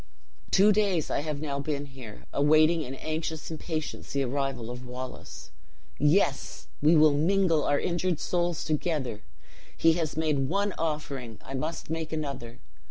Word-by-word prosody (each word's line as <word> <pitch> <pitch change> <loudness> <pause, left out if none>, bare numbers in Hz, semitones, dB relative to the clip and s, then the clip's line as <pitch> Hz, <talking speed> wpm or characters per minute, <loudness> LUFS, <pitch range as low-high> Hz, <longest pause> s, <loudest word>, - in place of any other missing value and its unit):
"Two 200 +2 +6
days 200 -6 +1
I - - +1
have 150 0 -3
now 140 -2 -2
been 145 0 -2
here, 130 -6 -11
awaiting 155 +3 +4
in 135 -3 -5
anxious 160 +2 -4
impatience 160 -1 -4
the 140 0 +1
arrival 130 -3 -2
of 125 +1 -7
Wallace. 125 +1 -8 0.5
Yes! 145 -1 +2
we 155 +3 +6
will 155 -1 +6
mingle 165 +1 +3
our 145 0 +2
injured 175 -1 0
souls 175 -2 0
together! 150 -7 -1 0.6
He 165 0 +5
has 160 -3 -2
made 150 -4 +1
one 200 +2 +1
offering; 140 -8 -3
I 135 - -7
must 155 +4 -4
make 160 -1 -3
another! 140 -7 -4
155 Hz, 150 wpm, -28 LUFS, 140-165 Hz, 0.6 s, Two